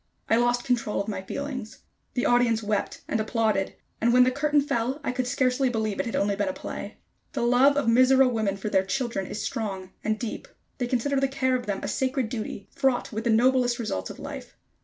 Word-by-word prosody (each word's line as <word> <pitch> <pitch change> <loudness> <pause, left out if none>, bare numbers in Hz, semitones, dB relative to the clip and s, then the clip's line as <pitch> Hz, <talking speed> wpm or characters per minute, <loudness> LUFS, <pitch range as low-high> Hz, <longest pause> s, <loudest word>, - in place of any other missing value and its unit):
I - - +5
lost 240 +1 +2
control 235 -4 0
of 200 - -2
my 205 -3 -3
feelings. 255 +2 -6 0.3
The 245 - 0
audience 240 -2 +3
wept 210 -1 -2
and 225 - 0
applauded; 215 -3 0 0.3
and 235 +2 +4
when 250 +1 +7
the 255 - +3
curtain 295 +2 +2
fell, 260 -1 -1
I - - 0
could 250 0 -2
scarcely 255 0 +2
believe 220 -4 -2
it - - -1
had 230 - -3
only 200 0 +1
been 205 0 -1
a - - -2
play. - - -7 0.4
The - - -1
love 255 +4 +5
of 285 - +1
Mizora 255 +3 +6
women 220 -5 0
for 195 - -5
their 190 -2 +3
children 235 -3 -2
is 210 - -4
strong 190 -4 -4
and 215 0 0
deep. 230 0 -5 0.3
They 245 - 0
consider 265 +3 +1
the 275 - +2
care 260 -1 0
of 250 - -3
them 200 -1 -2
a - - -2
sacred 260 -3 -1
duty, 215 -3 -5
fraught 265 -3 0
with 220 +2 -3
the - - +2
noblest 245 +1 +3
results 95 - -3
of - - -8
life. - - -8
240 Hz, 220 wpm, -26 LUFS, 215-255 Hz, 0.4 s, when